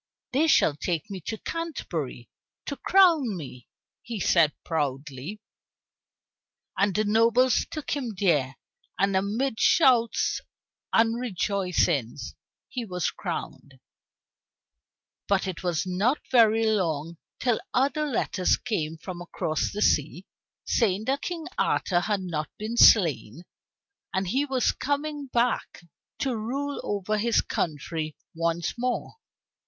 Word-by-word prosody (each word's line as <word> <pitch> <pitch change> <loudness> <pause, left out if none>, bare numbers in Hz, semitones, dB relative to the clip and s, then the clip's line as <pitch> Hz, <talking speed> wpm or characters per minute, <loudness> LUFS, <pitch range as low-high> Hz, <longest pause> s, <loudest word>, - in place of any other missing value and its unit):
"They 300 +5 +3
shall 155 - +4
take 165 +4 -3
me 190 -2 -6
to 220 - -2
Canterbury 170 - -5 0.4
to 280 - -4
crown 320 - +4
me," 130 -6 -9 0.3
he 230 -3 -6
said 170 -4 +4
proudly. 145 +3 -3 1.4
And 195 0 +1
the 215 - +2
nobles 230 +4 +3
took 310 -3 -5
him 250 -7 -2
there, 150 -9 +2 0.4
and 195 0 +2
amid 220 +6 0
shouts 245 -7 +3 0.5
and 225 +1 +3
rejoicings 180 - -1 0.3
he 250 - -4
was 180 -6 -2
crowned. 135 -2 -6 1.5
But 200 -1 +2
it 185 -2 -5
was 175 0 -1
not 200 +10 +1
very 225 -2 +5
long 170 -6 0 0.2
till 245 -4 +1
other 285 +4 +1
letters 205 -8 +1
came 165 -9 -3
from 175 +1 -7
across 155 -2 -2
the 210 - -1
sea, 155 +5 +1 0.4
saying 210 -2 +1
that 275 +3 0
King 340 -3 -4
Arthur 175 -3 +2
had 205 +2 -1
not 160 -4 -3
been 220 +2 -4
slain, 165 - +5 0.7
and 190 0 0
that - - -4
he 275 +3 +1
was 265 -3 +1
coming 290 0 -3
back 240 -6 -1 0.4
to 260 -3 0
rule 275 +6 -3
over 205 +1 -1
his 235 +2 +3
own - - -20
country 155 0 -3 0.2
once 170 0 -1
more. 250 0 -2
205 Hz, 125 wpm, -26 LUFS, 170-245 Hz, 1.5 s, very